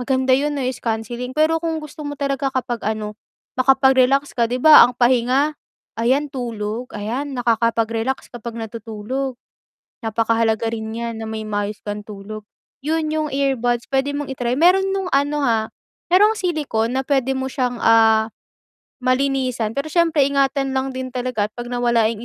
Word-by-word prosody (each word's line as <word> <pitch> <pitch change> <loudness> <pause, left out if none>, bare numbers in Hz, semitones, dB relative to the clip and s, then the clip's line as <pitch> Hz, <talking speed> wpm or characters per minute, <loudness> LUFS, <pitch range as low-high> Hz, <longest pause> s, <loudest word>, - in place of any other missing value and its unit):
maganda 260 +1 +1
yung 290 +1 -1
noise 255 -1 -2
cancelling 235 +2 -3
pero 315 +1 +3
kung 325 -1 -1
gusto 305 +1 -9
mo 290 - -4
talaga 275 -1 -1
kapag 240 -2 -2
ano, 215 -1 -3 0.4
makapag-relax 265 +1 +4
ka, 235 - +3
'di 250 +1 -1
ba, 310 -1 +10
ang 245 - -5
pahinga, 255 +4 +2 0.4
ayan 265 +6 +1
tulog, 235 -2 -4
ayan, 245 +8 -3
nakakapag-relax 230 +1 0
kapag 235 -1 -7
natutulog. 230 +4 -5 0.7
Napakahalaga 225 0 +1
rin 220 -1 -4
niyan 230 -1 -4
na 220 - -5
may 220 0 -5
maayos 205 0 -3
kang 205 0 -4
tulog. 210 +1 -8 0.4
'Yun 315 0 0
yung 310 -1 -1
earbuds 245 -4 0
pwede 270 +2 +1
mong 290 -1 -4
i-try, 245 -2 -2
meron 385 +3 +4
nung 385 -2 -2
ano 290 +1 +1
ha, 225 -3 +2 0.5
merong 420 +4 +6
silicon 275 - -1
na - - 0
pwede 270 -2 +1
mo 265 0 -2
siyang, 250 -2 -2
ah, 225 -1 +5 0.8
malinisan 255 -3 0
pero 280 +3 -2
siyempre 330 -4 +3
ingatan 275 -1 +1
lang 265 0 -1
din 260 0 -4
talaga 250 -4 -1
at - - -64
'pag 240 0 -6
nawala 235 -2 +2
yung 230 +1 -6
250 Hz, 160 wpm, -20 LUFS, 225-275 Hz, 0.8 s, ba